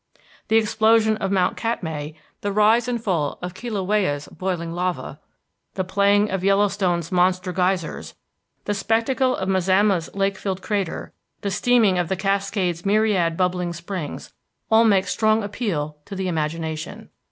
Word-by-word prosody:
The 220 - +2
explosion 220 0 +3
of 195 -2 -2
Mount 185 -2 +2
Katmai, 160 -10 -3 0.3
the 205 - -2
rise 215 +4 +4
and 245 -1 -1
fall 175 -10 -1
of 180 0 -4
Kilauea's 195 -8 -1
boiling 175 -3 -3
lava, 180 +1 -3 0.6
the 185 - -1
playing 200 +2 +2
of 190 -1 -2
Yellowstone's 195 -4 +1
monster 180 0 +1
geysers, 180 -2 -1 0.5
the 205 - 0
spectacle 230 +5 +1
of 190 - -3
Mazama's 190 -1 +2
lake 195 0 0
filled 190 -2 -3
crater, 200 -5 -3 0.3
the 200 - -2
steaming 210 -3 +3
of 175 -2 -1
the 190 - +1
Cascade's 195 -3 -1
myriad 195 -5 +2
bubbling 180 -1 0
springs, 170 -2 -6 0.4
all 225 +1 +6
make 195 -4 +4
strong 215 0 +2
appeal 175 -8 -3
to 200 - -7
the 190 0 -2
imagination. 160 -1 -3
190 Hz, 140 wpm, -22 LUFS, 180-210 Hz, 0.6 s, all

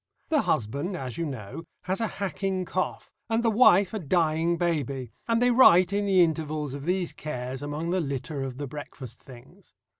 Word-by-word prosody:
The 305 -3 +3
husband, 140 - -1
as 130 -1 -6
you 165 - -1
know, 130 +2 -7 0.2
has 190 +4 -2
a 225 - +1
hacking 195 -1 -2
cough, 185 +1 -3 0.2
and 225 +1 +1
the 230 - +3
wife 205 -4 +5
a 215 - -2
dying 165 0 +1
baby, 140 -8 -2 0.2
and 230 -1 +2
they 245 0 +4
write 190 -7 +6
in 205 0 0
the 190 -2 +5
intervals 155 -3 -2
of 140 0 -7
these 180 0 -1
cares 130 -3 -5
among 150 +4 -3
the 185 0 +1
litter 140 0 -4
of 130 -2 -5
the 145 - -4
breakfast 135 -3 -9
things. 120 -3 -16
165 Hz, 185 wpm, -27 LUFS, 140-190 Hz, 0.2 s, write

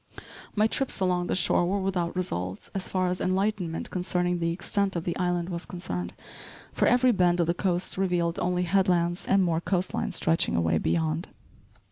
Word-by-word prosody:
My 210 0 +4
trips 260 +2 0
along 180 -2 +1
the - - 0
shore 180 -1 +3
were 200 +2 0
without 185 -3 -1
results, 95 - -3
so 195 - -1
far 185 -1 0
as 180 - -2
enlightenment 185 -3 -1
concerning 180 -1 0
the 170 0 0
extent 195 +2 -1
of 170 - -2
the 170 - -2
island 175 -1 -1
was 170 -1 -4
concerned, 90 - -5 0.6
for - - +2
every 250 +1 +5
bend 180 -4 +2
of 170 - +3
the 170 - +1
coast 180 0 -1
revealed 175 -3 0
only 180 0 0
headlands 175 -1 +1
and 195 -1 +4
more 165 -2 +1
coast 185 0 -1
line - - -1
stretching 165 0 +1
away 80 -1 +2
beyond. 80 0 0
180 Hz, 180 wpm, -27 LUFS, 170-190 Hz, 0.6 s, every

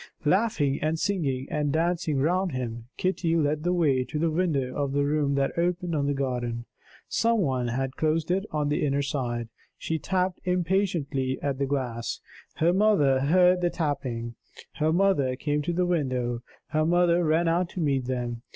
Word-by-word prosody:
Laughing 150 -6 +2
and 155 +1 0
singing 150 -9 -1
and 150 -3 0
dancing 165 -1 0
round 180 +5 +1
him, 120 -3 -4
Kitty 185 -3 0
led 150 -1 +1
the 175 +3 0
way 150 -8 +2
to 150 - -5
the 165 +1 +1
window 155 -7 0
of 140 -1 -1
the 145 0 +2
room 145 -1 +1
that 135 0 0
opened 175 0 0
on 145 -2 0
the 145 - 0
garden. 120 -3 -2 0.4
Some 230 0 +2
one 130 -7 0
had 130 +2 -2
closed 160 +1 0
it 190 +2 +1
on 150 -1 -1
the 150 - 0
inner 140 -1 +1
side. 120 -5 -3 0.3
She 160 0 -2
tapped 185 +2 -1
impatiently 175 -7 0
at 140 -2 -1
the 140 - 0
glass. 125 -4 -2 0.4
Her 170 +2 +2
mother 185 -10 +4
heard 180 +5 +4
the 175 - +2
tapping; 130 -8 -3 0.4
her 155 0 +2
mother 165 -8 +2
came 145 +2 -1
to 160 - -2
the 180 +1 +1
window; 130 -8 -1 0.3
her 155 0 +1
mother 175 +1 +3
ran 165 +2 +2
out 170 +1 +1
to 185 - -7
meet 140 -5 +1
them. 120 -2 -3
150 Hz, 180 wpm, -26 LUFS, 135-175 Hz, 0.4 s, mother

